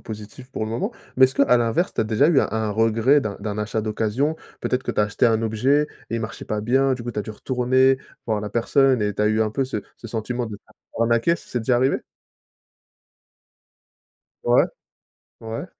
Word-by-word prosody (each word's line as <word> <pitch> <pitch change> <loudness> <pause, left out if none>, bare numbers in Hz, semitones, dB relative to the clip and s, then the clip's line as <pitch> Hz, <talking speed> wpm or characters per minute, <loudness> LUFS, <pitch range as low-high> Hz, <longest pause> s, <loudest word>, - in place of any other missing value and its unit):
positives 110 +4 -9
pour 110 - -3
le 110 - -5
moment, 115 - -2 0.2
mais 130 - +8
est-ce 130 +1 +1
que - - 0
à 125 -3 +5
l'inverse, 120 +9 0
tu - - +1
as - - -3
déjà 110 +7 +3
eu 155 -6 +5
un - - 0
un 110 -1 -1
regret 115 +6 +3
d'un 100 -2 -4
d'un 105 0 -4
achat 105 +1 -2
d'occasion? 110 +8 -1 0.2
Peut-être 125 +1 -1
que - - -2
tu - - +1
as - - +4
acheté 105 +3 0
un 115 -2 +3
objet, 125 +7 +2 0.2
et 115 - -1
il 115 - -2
marchait 110 0 -6
pas 105 -1 -2
bien, 135 +4 +2
du 125 -2 -3
coup, 120 - -4
tu - - -5
as 105 - 0
dû - - -7
retourner, 130 +3 +2 0.3
voir 110 -3 -1
la 105 - -5
personne 130 +3 +3
et 105 -1 0
tu 105 - -1
as 105 - +3
eu 110 +1 +1
un 110 -1 +1
peu 135 +5 0
ce 130 -4 -3 0.2
ce - - -10
sentiment 120 +2 -3
de 110 -3 -6
se - - -25
faire - - -13
arnaquer, 115 +8 +3
c - - -16
c'est 120 - -2
déjà 120 +2 +2
arrivé? 130 +2 +2 2.5
Ouais, - - +5 0.8
ouais. 115 +8 -5
115 Hz, 230 wpm, -23 LUFS, 110-130 Hz, 2.5 s, mais